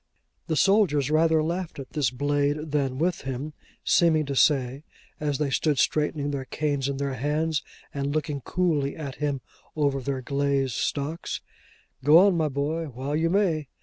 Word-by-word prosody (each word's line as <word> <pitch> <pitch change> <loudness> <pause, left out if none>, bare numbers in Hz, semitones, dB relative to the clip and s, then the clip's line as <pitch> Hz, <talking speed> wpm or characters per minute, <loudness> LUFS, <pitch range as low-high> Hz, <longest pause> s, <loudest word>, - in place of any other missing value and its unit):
The 160 - 0
soldiers 155 - +3
rather 160 0 +3
laughed 170 +2 -3
at 135 -2 -8
this 145 -6 +1
blade 145 +3 -1
than 135 -3 0
with 170 +4 0
him: 135 +3 -5 0.3
seeming 160 -3 +3
to 140 0 -3
say, 135 0 +2 0.4
as 145 -2 -1
they 145 -1 -1
stood 150 0 +1
straightening 150 0 +1
their 135 -2 -3
canes 140 -1 -1
in 140 - -3
their 140 -1 -2
hands, 150 +3 0 0.3
and 140 0 -2
looking 150 -2 -2
coolly 155 -4 0
at 140 -4 -6
him 145 -2 -1 0.3
over 140 -3 +1
their 130 0 -3
glazed 140 -1 0
stocks, 150 +7 -2 0.6
'Go 150 +4 +7
on, 190 +1 +6
my 160 -2 +1
boy, 145 +4 -2
while 135 +1 -4
you 165 +2 +1
may! 170 -6 +1
145 Hz, 165 wpm, -26 LUFS, 140-155 Hz, 0.6 s, Go